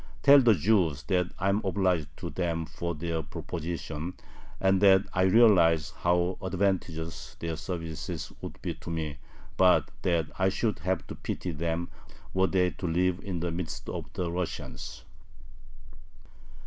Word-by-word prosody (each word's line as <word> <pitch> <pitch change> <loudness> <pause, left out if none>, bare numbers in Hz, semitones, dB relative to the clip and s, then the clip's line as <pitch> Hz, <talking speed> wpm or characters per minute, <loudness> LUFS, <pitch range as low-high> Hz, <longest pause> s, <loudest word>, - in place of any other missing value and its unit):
Tell 140 0 +9
the 115 -4 +5
Jews 85 -5 +2
that 90 -1 +1
I 95 +1 +1
am 100 +2 +2
obliged 90 -5 +1
to - - -5
them 85 -2 -1
for 85 +1 -4
their 80 +1 -2
proposition, 80 +2 -5 0.4
and 95 0 +3
that 95 -1 +7
I 90 - +1
realize 90 -7 +5
how 90 +1 0
advantageous 90 -4 -2
their 80 -1 -4
services 80 -1 -5
would - - -7
be 85 - -2
to 80 +1 -10
me, 80 -3 -3 0.4
but 90 -1 +4
that 85 -3 +1
I 95 0 +4
should 105 +2 -1
have 95 -2 -1
to - - -7
pity 90 - -4
them 85 +2 -2 0.4
were 95 0 +3
they 90 -2 +2
to 90 - -5
live 90 +2 +1
in 90 -4 -4
the 85 -1 -1
midst 85 -1 -5
of - - -5
the 85 -2 -2
Russians. 85 -8 -5
90 Hz, 150 wpm, -29 LUFS, 80-95 Hz, 0.4 s, Tell